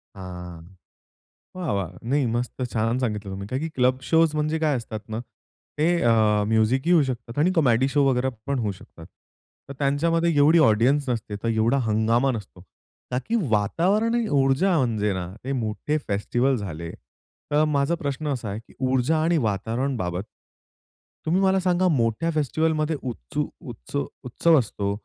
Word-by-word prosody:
हां, 90 -3 -8 0.9
वाह, 180 -8 -3
वाह! 90 -4 -3 0.2
नाही, 140 0 +2
मस्त. 120 +2 -3
छान 115 +3 0
सांगितलं 105 -5 -3
तुम्ही. 100 +1 -6
का 130 - -2
की 160 +4 -3
क्लब 130 0 +2
शोज 160 -2 +4
म्हणजे 155 +1 0
काय 155 -3 +1
असतात 110 -2 -6
ना, 110 +1 -3 0.6
ते 155 +2 +2 0.2
अ, 120 - +4 0.4
म्युझिकही 110 +8 +2
होऊ 160 -4 +5
शकतात, 120 -2 -5
आणि 170 +5 +3
कॉमेडी 130 -5 +3
शो 145 -1 +4
वगैरे 130 0 +1 0.2
पण 140 -2 0
होऊ 105 -3 -1
शकतात. 90 -3 -14 0.6
तर - - -5
त्यांच्यामध्ये 165 +4 +1
एवढी 155 +4 +6
ऑडियन्स 135 +2 +3
नसते, 110 -3 -3
तर - - -1
एवढा 115 +4 +2
हंगामा 115 +5 +2
नसतो. 105 -6 -8 0.5
ताकी 130 - -1
वातावरण 185 - +1
आणि 235 -2 0
ऊर्जा 165 +8 +2
म्हणजे 110 -6 +1
ना, 90 -2 -4 0.2
ते 135 - -4
मोठे 120 +5 -2
फेस्टिव्हल 120 +6 +1
झाले. 85 -5 -6 0.6
तर 150 +1 +4
माझा 140 +4 +2
प्रश्न 145 -1 -4
असा 120 -5 -5
आहे, 100 +2 -4
की 115 - -19 0.2
ऊर्जा 130 +5 +2
आणि 170 +1 +2
वातावरणबाबत, 110 - -1 1.0
तुम्ही 175 +4 +2
मला 190 0 +3
सांगा 185 0 +2
मोठ्या 125 0 +1
फेस्टिव्हलमध्ये 155 +1 0
उत्स 110 - -7 0.2
उत्स - - -10 0.3
उत्सव 160 +6 +3
असतो, 100 -4 -2
130 Hz, 155 wpm, -24 LUFS, 110-155 Hz, 1.0 s, एवढी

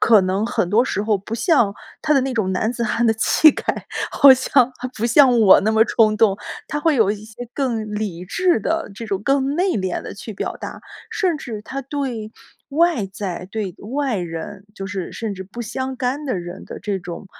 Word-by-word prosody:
可 220 -3 +6
能 190 +3 0
很 180 - 0
多 225 +5 +4
时 205 - -2
候 210 -2 +1
不 210 +4 -6
像 235 - +2 0.3
他 305 -1 +2
的 275 - +5
那 265 0 -2
种 200 -5 0
男 220 +5 0
子 235 -1 -2
汉 230 +2 +1
的 225 - +4
气 310 +7 +5
概， - - -7 0.5
好 275 -1 +8
像 260 -1 +2
还 255 - -4
不 225 - -2
像 245 -1 +5
我 200 -4 +7
那 215 +3 +1
么 220 0 +5
冲 215 -1 +3
动， 210 -3 +3 0.3
他 295 - -2
会 310 +1 +2
有 220 -5 +4
一 210 0 -5
些 225 +2 -9
更 225 -6 -2
理 195 -5 -4
智 355 - +1
的， 325 +3 -2
这 230 +2 -7
种 195 -2 -2
更 275 0 +1
内 370 +2 +2
敛 185 -3 -2
地 - - -8
去 215 +2 -8
表 - - -4
达， - - -7 0.3
甚 365 -5 0
至 220 -7 -7
他 275 +5 -5
对 260 -6 -4 0.4
外 305 - +2
在 190 -2 -5
对 205 -5 -4 0.2
外 275 -5 0
人， 175 +3 -6
就 195 - -6
是 195 -3 -5
甚 220 -3 -4
至 190 - -7
不 200 +6 -9
相 260 +3 -4
干 260 +4 -2
的 255 -9 -1
人 175 0 -8
的 - - -8
这 205 -2 -3
种 175 +1 -8
225 Hz, 230 characters per minute, -21 LUFS, 200-265 Hz, 0.5 s, 好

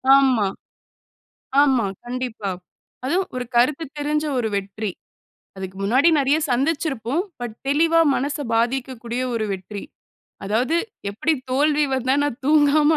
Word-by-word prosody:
ஆமா. 260 -7 +4 1.2
ஆமா. 260 -7 +3 0.2
கண்டிப்பா. 240 -4 -4 0.5
அதுவும் 370 +8 0
ஒரு 250 - -2
கருத்து 270 +7 +3
தெரிஞ்ச 300 +1 0
ஒரு 230 -3 0
வெற்றி. 200 +2 -3 0.7
அதுக்கு 190 0 -7
முன்னாடி 255 +10 +4
நிறைய 280 +2 +3
சந்திச்சிருப்போம். 275 +1 0 0.2
பட் 240 -3 -5
தெளிவா 325 +4 +4
மனச 285 +3 -1 0.2
பாதிக்கக்கூடிய 245 0 -1
ஒரு 225 -2 0
வெற்றி. 195 +2 -6 0.6
அதாவது 240 +10 +1 0.3
எப்பிடி 265 +11 0 0.2
தோல்வி 295 +3 +3
வந்தா, 260 0 +1
நான் 290 -2 -3
தூங்காம 300 0 +5
260 Hz, 115 wpm, -22 LUFS, 230-295 Hz, 1.2 s, தூங்காம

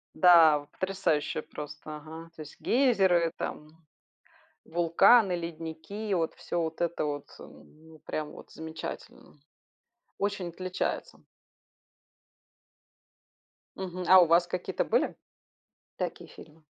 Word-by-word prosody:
Да 165 -4 +7
вот, 145 - -17
потрясающие 185 -6 -1
просто, 150 +1 -8
ага, 160 +2 -10
то 155 - -7
есть: 150 - -13
гейзеры, 190 -10 +3
там, 150 0 -5 0.9
вулканы, 175 +5 +4
ледники- 165 +5 -6
и - - +1
вот 165 -3 0
всё 175 - -3
вот 160 0 -4
это 170 -2 -1
вот, 145 -1 -3
м, 155 +1 -16
ну 160 -1 -15
прям 150 -1 -4
вот - - -13
замечательно. 160 -1 -8 0.8
Очень 195 -3 -2
отличается. 185 +2 -4 2.6
Мгм. 185 -1 -5
А 190 - +9
у 175 - +6
вас 170 +2 +4
какие-то 180 0 -2
были? - - 0 0.8
Такие - - -4
фильмы? 155 +1 -15
165 Hz, 115 wpm, -29 LUFS, 155-185 Hz, 2.6 s, А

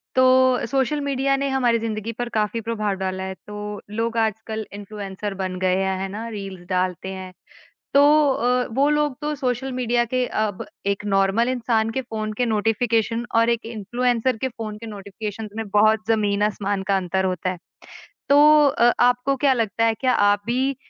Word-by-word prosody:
तो 255 0 +4
social 275 +2 +1
media 275 -1 +1
ने 275 - -1
हमारी 245 -3 +2
ज़िंदगी 220 0 -3
पर 245 0 -2
काफ़ी 215 +1 0
प्रभाव 215 -3 -2
डाला 190 0 -3
है 190 0 -4
तो 210 -1 -6
लोग 230 +2 -2
आजकल 220 0 -1
इन्फ्लुएंसर 205 0 -6
बन 185 -1 -4
गए 185 0 +2
हैं, 190 0 -1
है 195 - -2
ना? 215 +4 -6
रील्स 195 -4 -7
डालते 185 0 -1
हैं। 185 -1 -8 0.6
तो 280 - +7 0.3
अ, 250 0 +1
वो 270 +5 +2
लोग 295 -3 +1
तो 300 0 -2
सोशल 260 -1 -2
मीडिया 240 -1 +1
के 250 +2 -1
अब 215 -4 -2 0.2
एक 200 +1 -1
नॉर्मल 195 +5 +2
इंसान 230 -3 0
के 265 - -2
फ़ोन 220 -3 -4
के 245 - +2
नोटिफ़िकेशन 225 +1 0
और 230 0 +4
एक 235 -1 -1
इन्फ्लुएंसर 240 +3 -1
के 260 - -2
फ़ोन 225 -3 -7
के 230 - -9
नोटिफ़िकेशन 210 +1 -6
में 225 - -3
बहुत 215 +2 +3
ज़मीन 205 -2 +1
आसमान 205 -1 -1
का 195 - +4
अंतर 190 0 -1
होता 185 -1 -1
है। 185 - -6 0.7
तो 295 +1 +7
अ, 240 -3 +4
आपको 250 +3 +3
क्या 275 0 +3
लगता 230 -2 0
है 225 - +3
क्या 255 +2 0 0.2
आप 205 - 0
भी 255 +4 +1
अ, - - -8
225 Hz, 185 wpm, -22 LUFS, 205-250 Hz, 0.7 s, तो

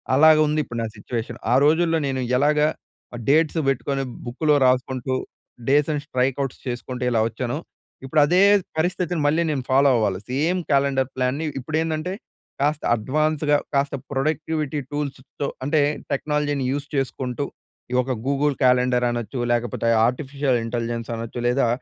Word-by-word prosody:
అలాగా 155 +2 +7
ఉంది 155 +1 0
ఇప్పుడు 120 -4 -6
నా - - -2
సిట్యుయేషన్. 115 -2 -5
ఆ - - +5
రోజుల్లో 165 +1 +3
నేను 130 -1 -1 0.2
ఎలాగా 150 +2 +3 0.5
ఆహ్, 120 - -6
డేట్స్ 160 +2 +3
పెట్టుకొని 135 +1 -1 0.2
బుక్‌లొ 150 +5 +1
రాసుకుంటూ 130 0 0 0.5
డేస్‌ని 145 +1 +2
స్ట్రైక్ 130 -2 0
అవుట్స్ 135 -2 -4
చేసుకుంటూ 125 +1 -4
ఎలా 115 - +2
వచ్చానో, 120 +3 -3 0.5
ఇప్పుడు 150 +3 +3
అదే 180 +5 +3 0.4
పరిస్థితిని 175 -1 0
మళ్ళీ 155 +3 +3
నేను 135 -4 -2
ఫాలో 135 +2 +5
అవ్వాలి. 100 -5 +1
సేమ్ 160 +8 +1
క్యాలెండర్ 135 -1 +2
ప్లాన్‌ని 130 +5 -1
ఇప్పుడేందంటే 155 +5 -2 0.5
కాస్త 150 +1 +1
అడ్వాన్స్‌గా 150 +5 +1 0.2
కాస్త 140 0 +1 0.2
ప్రొడక్టివిటీ 155 +1 -1
టూల్స్‌తొ 140 -1 -4 0.2
అంటే 150 +2 +2 0.3
టెక్నాలజీని 145 -1 0
యూజ్ 140 +1 -3
చేసుకుంటూ, 130 0 -2 0.5
ఈ - - -3
ఒక 130 - -4 0.2
గూగుల్ 140 +1 +1
క్యాలెండర్ 125 -1 +3
అనొచ్చు, 120 +1 -4
లేకపోతే 120 -1 -1 0.2
ఆర్టిఫిషియల్ 135 0 -1
ఇంటెలిజెన్స్ 115 0 -3
అనొచ్చు, 115 +1 -6
లేదా 125 0 +2
140 Hz, 135 wpm, -23 LUFS, 125-150 Hz, 0.5 s, అలాగా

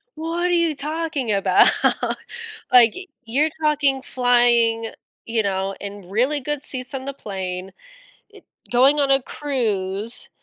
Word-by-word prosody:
"What 330 +2 -3
are - - +2
you 335 -3 +2
talking 300 -4 -3
about? 195 -1 +4 1.1
Like, 240 -3 +7 0.3
you're 275 +7 +1
talking 290 -3 +2
flying, 240 -3 +2 0.3
you 225 -1 0
know, 195 0 -2
in 200 -2 -8
really 255 +9 +1
good 295 +1 -4
seats 255 0 -8
on 265 -1 -5
the 275 - -4
plane, 190 -5 -6 0.6
eh, - - -14 0.3
going 265 +4 +4
on 275 -1 +2
a 270 0 +4
cruise, 225 -6 -3
250 Hz, 130 wpm, -22 LUFS, 215-285 Hz, 1.1 s, Like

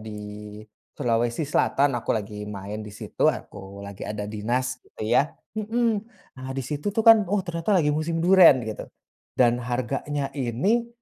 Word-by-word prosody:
di 105 0 -8 0.3
Sulawesi 120 +4 0
Selatan 140 -1 +2
aku 120 -2 -4
lagi 105 -1 -6
main 105 +1 -6
di 105 - -8
situ, 105 0 -1
aku 100 0 -5
lagi 100 -1 -10
ada 105 -1 -4
dinas 120 +5 -2
gitu - - -11
ya 120 +5 +4 0.4
mhm. 225 0 0 0.4
Nah 130 - -7
di 135 - -2
situ 150 +7 -3
tuh 220 +2 -1
kan, 225 -1 +9
"Oh 200 -1 0
ternyata 170 +3 0
lagi 150 -4 +3
musim 155 +2 -1
duren," 175 -9 +7
gitu. 110 -1 -6 0.5
Dan 120 -1 +3
harganya 135 +4 -2
ini 150 - 0
125 Hz, 160 wpm, -25 LUFS, 105-165 Hz, 0.5 s, kan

